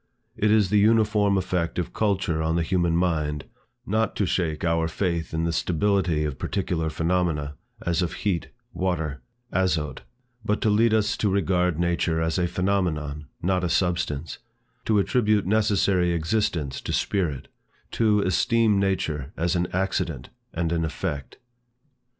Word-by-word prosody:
It 105 - +1
is 105 -3 +3
the 105 - +5
uniform 105 -2 +3
effect 90 -2 -1
of 90 - -3
culture 95 -6 0
on 80 +1 0
the 85 - +1
human 85 0 +1
mind, 75 -5 0 0.4
not 110 0 0
to 100 - +1
shake 80 -3 -1
our 85 0 +1
faith 85 -1 -2
in 80 +1 -1
the 85 0 0
stability 90 -2 +1
of 70 -3 -4
particular 90 -5 -1
phenomena, 80 -3 0 0.3
as 85 0 +1
of 85 -1 -1
heat, 95 -5 0 0.3
water, 80 -6 -2 0.3
azote; 85 -6 0 0.4
but 105 0 0
to 110 - +3
lead 115 +2 +4
us 110 0 +2
to 105 - +1
regard 90 -3 +1
nature 85 -1 +1
as 80 +2 0
a 90 - +2
phenomenon, 85 -6 -1 0.2
not 90 +1 +1
a 90 - 0
substance; 85 -4 -1 0.5
to 110 - +2
attribute 105 0 +2
necessary 100 -4 +2
existence 80 -4 -1
to - - -4
spirit; 80 -10 -1 0.4
to 105 -2 +2
esteem 105 +3 +2
nature 80 -7 -1
as 85 +2 0
an 90 0 +1
accident 90 -8 -2 0.2
and 80 0 -2
an 85 -1 0
effect. 75 -3 -4
90 Hz, 150 wpm, -25 LUFS, 80-100 Hz, 0.5 s, the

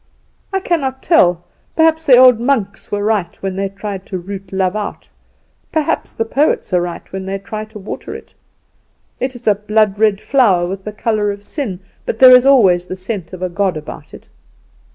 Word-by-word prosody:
I 385 - 0
cannot 275 -8 -2
tell, 175 - +3 0.3
perhaps 320 0 +3
the 255 -3 +8
old 250 -2 +7
monks 235 -6 -1
were 205 0 -1
right 210 -4 0
when 190 -1 -2
they 195 0 -2
tried 195 -1 -6
to 190 - -4
root 190 +1 -8
love 190 0 0
out; 210 -1 -5 0.6
perhaps 315 -3 -1
the 225 - -2
poets 270 -4 0
are 180 - +3
right 175 -1 -5
when 190 0 -4
they 195 +1 -2
try 215 +2 -6
to 215 0 -12
water 200 0 -7
it. - - -12 0.9
It 260 +1 -3
is 245 - -12
a 210 - +5
blood 210 0 0
red 215 -2 +3
flower, 210 -12 +2
with 190 +2 -6
the 210 - -4
colour 210 -1 -1
of 200 0 -5
sin; 205 - -5 0.2
but - - -3
there 255 +1 +9
is 250 +1 +4
always 190 -10 +4
the 185 - -5
scent 185 -2 -5
of 185 -1 -7
a 185 - -1
god 185 -1 -1
about 155 - -9
it." - - -16
205 Hz, 195 wpm, -17 LUFS, 190-245 Hz, 0.9 s, there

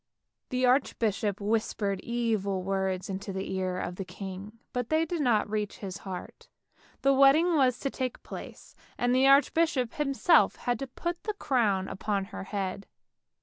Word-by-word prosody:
The 255 0 +1
archbishop 220 -6 +1
whispered 205 -2 -1
evil 215 -5 -1
words 190 -1 -1
into 195 +1 -5
the 190 0 -4
ear 185 -1 -1
of 180 -1 -4
the 195 - -3
king, 195 +3 -8 0.2
but 245 -2 -2
they 315 +1 +2
did 330 0 -2
not 235 -6 +2
reach 210 -1 -3
his 195 -2 -6
heart. 190 -3 -8 0.5
The 275 0 +5
wedding 285 +6 +5
was 255 -4 +3
to 275 - -1
take 255 -2 -4
place, - - -9 0.2
and 245 0 +1
the 260 +1 +5
archbishop 275 -2 +3
himself 295 +4 +3
had 245 -2 -2
to 275 - -4
put 345 +7 -4
the 425 -1 -2
crown 215 - +1
upon 200 0 -2
her 195 - -5
head. 195 -1 -4
220 Hz, 160 wpm, -29 LUFS, 195-270 Hz, 0.5 s, The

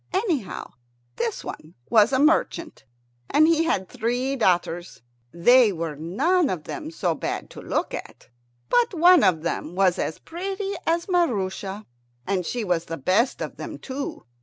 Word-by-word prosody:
Anyhow 355 - -2 0.5
this 230 -2 -2
one 155 +2 -9
was 220 +1 +5
a 260 - +2
merchant, 310 - +1 0.4
and 310 +2 +5
he 330 0 +3
had 190 - 0
three 250 +3 -1
daughters. 175 - 0 0.3
They 240 +6 +5
were 165 -4 -4
none 275 - +1
of 170 -4 -3
them 320 -4 -6
so 190 - -1
bad - - -4
to - - -10
look - - -2
at, - - -8 0.4
but 475 -5 +2
one 350 +2 +6
of 175 -5 +3
them 170 0 -3
was 185 -2 +3
as 160 - -2
pretty 390 +3 -4
as 335 +1 +1
Maroosia. 205 - -1 0.4
And 185 -3 -1
she 240 -2 -2
was 175 -4 0
the 165 - -5
best 195 - +1
of - - -7
them - - -6
too. 275 +1 -6
235 Hz, 160 wpm, -24 LUFS, -, 0.5 s, one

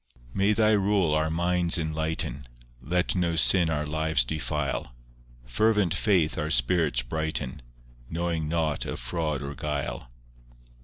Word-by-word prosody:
V - - -27 0.2
May 100 +2 +4
Thy 110 0 +3
rule 100 -5 +2
our 80 0 +1
minds 85 +1 +2
enlighten; 80 -4 -2 0.3
Let 90 +7 0
no 85 -3 0
sin 85 0 +4
our 75 -1 -1
lives 80 -3 +1
defile; 75 -3 -3 0.5
Fervent 105 - +2
faith 90 -7 +1
our 75 0 -2
spirits 65 0 +2
brighten, 80 0 -3 0.5
Knowing 85 -1 -2
nought 80 -2 0
of - - -5
fraud 75 +3 -3
or 70 +1 -5
guile. 70 -2 -4
80 Hz, 135 wpm, -26 LUFS, 75-85 Hz, 0.5 s, May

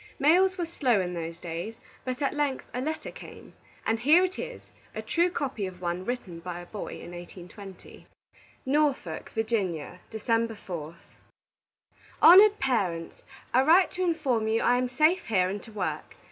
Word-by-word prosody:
Mails 365 +6 +4
were 350 - -1
slow 260 -9 +1
in 180 -1 -2
those 165 -1 -5
days, 175 +6 -5 0.3
but 255 +2 -3
at 275 - +1
length 290 -3 -1
a 250 - -2
letter 310 +3 -4
came; - - -12 0.3
and 225 0 +1
here 305 +9 +5
it 370 - -6
is, - - -6 0.3
a - - -3
true 345 +1 +2
copy 260 - -3
of 180 -1 -10
one 175 +1 -3
written 205 -9 -4
by 175 0 -6
a 175 - -9
boy 205 +3 -7
in - - -10
1820: 180 +2 -11 0.6
NORFOLK, 270 - 0
VA., 195 -8 -2
December 225 +1 0
4th. 170 -4 -8 1.1
"HONORED 400 +5 +8
PARENTS: 190 -11 -1 0.3
I 255 - +6
write 340 +7 +5
to 370 - -5
inform 280 -10 0
you 225 +1 +1
I 245 - +4
am 250 0 -1
safe 310 +8 +2
here 185 -5 +2
and 200 +1 -4
to 225 - -13
work. 205 -4 -4
230 Hz, 165 wpm, -27 LUFS, 180-300 Hz, 1.1 s, HONORED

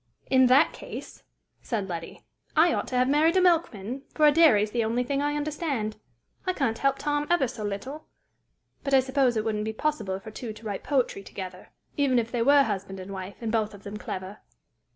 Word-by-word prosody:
"In 260 -1 +6
that 270 +6 +5
case," - - -9 0.4
said 210 -5 -3
Letty, 170 -2 -7 0.3
"I 325 +1 +5
ought - - -2
to 255 - -4
have 250 0 +3
married 310 +6 +3
a - - +5
milkman, 275 - +1
for 305 - +4
a 300 - +8
dairy 295 -10 +6
is 210 - -3
the 235 0 0
only 230 +3 0
thing 275 +3 -1
I 290 0 0
understand. 290 -7 -2 0.5
I 370 - +2
can't 245 -9 -1
help 275 0 +2
Tom 295 0 -1
ever 345 -7 +3
so 230 -3 -7
little! 210 +10 -5 0.8
But 275 -1 +2
I - - +7
suppose 260 -2 +1
it 215 - -1
wouldn't 210 -1 -1
be 220 +1 -3
possible 215 -8 -2
for 215 - -10
two 220 0 -6
to 220 +1 -14
write 205 -2 -3
poetry 260 -8 0
together, 185 -2 -8 0.3
even 275 -3 +3
if 230 -1 0
they 240 - -1
were 280 +3 +6
husband 195 -4 -4
and 185 +1 -8
wife, 190 +1 -6
and 225 -2 -2
both 215 -2 0
of 200 - -15
them 205 +1 -6
clever!" 190 0 -6
245 Hz, 215 wpm, -27 LUFS, 210-285 Hz, 0.8 s, a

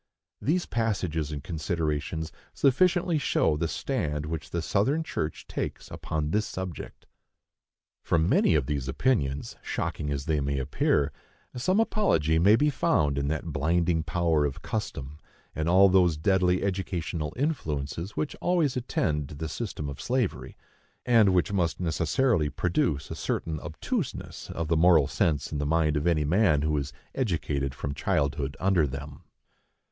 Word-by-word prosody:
These 175 +5 +1
passages 90 -9 -1
and 70 -2 -5
considerations 80 -1 -2 0.2
sufficiently 175 +4 +3
show 105 - +2
the 80 +2 -1
stand 75 - -2
which 80 0 -5
the 85 -1 -2
Southern 135 - +1
church 75 - -4
takes - - -5
upon 75 -1 -3
this 105 +3 +1
subject. 95 -4 -7 1.0
For 85 - +1
many 80 0 +3
of 75 -4 +2
these 70 -1 -2
opinions, 70 - 0
shocking 75 - -3
as 70 -1 -3
they 80 -2 +1
may 70 0 -1
appear, 70 +2 +1 0.4
some 185 - +1
apology 80 - +2
may 100 +6 +6
be 150 +5 +2
found 80 - +1
in 70 - -1
that 80 +1 -3
blinding 80 +3 +1
power 80 -1 +1
of 70 -2 -3
custom 70 +3 -4 0.3
and 80 +2 -1
all 95 +3 +7
those 90 -4 +4
deadly 90 +2 +2
educational 90 -5 -2
influences 85 - -3
which 150 - -2
always 170 -7 +2
attend 75 - -1
the 75 +3 -5
system 85 -5 -4
of 70 - -6
slavery, 125 -5 -2 0.5
and 115 -5 +5
which 90 +2 +1
must 85 -4 0
necessarily 85 - +1
produce 80 -3 -1
a - - -3
certain 80 -2 -2
obtuseness - - -4
of 85 -1 -3
the 80 - +2
moral 80 -2 +5
sense 75 +2 0
in 75 - -2
the 75 - -1
mind 80 -1 +2
of 75 +3 0
any 80 -3 +2
man 80 -3 +3
who 75 0 +1
is 70 -1 -2 0.2
educated 75 - -1
from 70 +3 -4
childhood 70 0 -1
under 90 -5 +3
them. 70 +1 -8
80 Hz, 150 wpm, -27 LUFS, 75-100 Hz, 1.0 s, all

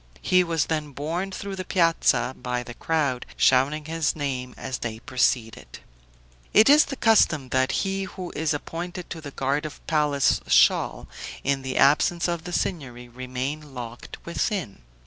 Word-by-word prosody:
He 185 0 +4
was 165 -3 0
then 155 -3 -3
borne 165 +7 -3
through 195 0 -6
the 185 - -3
piazza 165 -7 +2
by 125 0 -3
the 120 - -9
crowd, 140 -3 -1
shouting 140 +4 +3
his 160 -1 -1
name 130 -4 -4
as 130 -2 -5
they 110 -2 -4
proceeded. 120 -2 -1 0.8
It 220 +4 +7
is 300 +1 +7
the 275 - -5
custom 165 - +3
that 130 0 +1
he 195 0 -2
who 185 -2 -8
is 160 0 0
appointed 175 +4 -5
to 165 - -6
the 145 - -7
guard 140 +2 -1
of 155 - -6
the - - -21
palace 150 -3 +1
shall, - - +3 0.4
in 135 0 0
the 130 -1 -4
absence 170 +5 +3
of 170 -2 -3
the 180 - -5
Signory, 125 -10 -3
remain 130 +4 -5
locked 120 -1 -8
within. 170 - -2
150 Hz, 165 wpm, -25 LUFS, 130-170 Hz, 0.8 s, It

